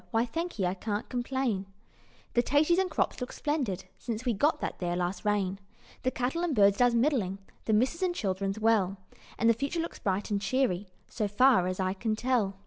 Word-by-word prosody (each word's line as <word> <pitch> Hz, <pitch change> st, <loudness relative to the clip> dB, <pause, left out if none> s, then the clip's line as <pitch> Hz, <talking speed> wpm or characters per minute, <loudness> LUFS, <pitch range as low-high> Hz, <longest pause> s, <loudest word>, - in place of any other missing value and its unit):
Why, 225 Hz, 0 st, +2 dB
thankee, 325 Hz, -, -2 dB
I 180 Hz, -, +1 dB
can't 205 Hz, +2 st, -3 dB
complain; 245 Hz, -5 st, -1 dB, 0.7 s
The 240 Hz, -, +4 dB
taties 305 Hz, +7 st, +3 dB
and 380 Hz, -1 st, +1 dB
crops 315 Hz, -, -1 dB
looks 250 Hz, -, -5 dB
splendid, 260 Hz, -, -1 dB
Since 230 Hz, +1 st, -4 dB
we 245 Hz, -, +2 dB
got 290 Hz, +9 st, +2 dB
that -, -, -4 dB
there 175 Hz, -1 st, -1 dB
last 180 Hz, +2 st, -2 dB
rain: 200 Hz, -2 st, 0 dB, 0.4 s
The 255 Hz, -, +1 dB
cattle 260 Hz, +6 st, -2 dB
and 330 Hz, -5 st, 0 dB
birds 200 Hz, -2 st, +5 dB
does 245 Hz, -1 st, +4 dB
middling, 230 Hz, -7 st, +1 dB, 0.3 s
The 220 Hz, -, +1 dB
missus 255 Hz, -, +2 dB
and 360 Hz, -2 st, +1 dB
children's 195 Hz, -, -2 dB
well, 210 Hz, -4 st, +2 dB, 0.4 s
And 230 Hz, -, +2 dB
the 230 Hz, -, +7 dB
future 280 Hz, +8 st, -2 dB
looks 330 Hz, -, -4 dB
bright 195 Hz, +1 st, -1 dB
and 200 Hz, -1 st, 0 dB
cheery, 205 Hz, -3 st, 0 dB, 0.2 s
So 215 Hz, -3 st, -2 dB
far 210 Hz, -2 st, +4 dB
as 185 Hz, +1 st, -3 dB
I 185 Hz, 0 st, +1 dB
can 215 Hz, +2 st, -1 dB
tell. 225 Hz, -5 st, 0 dB
225 Hz, 200 wpm, -29 LUFS, 195-260 Hz, 0.7 s, the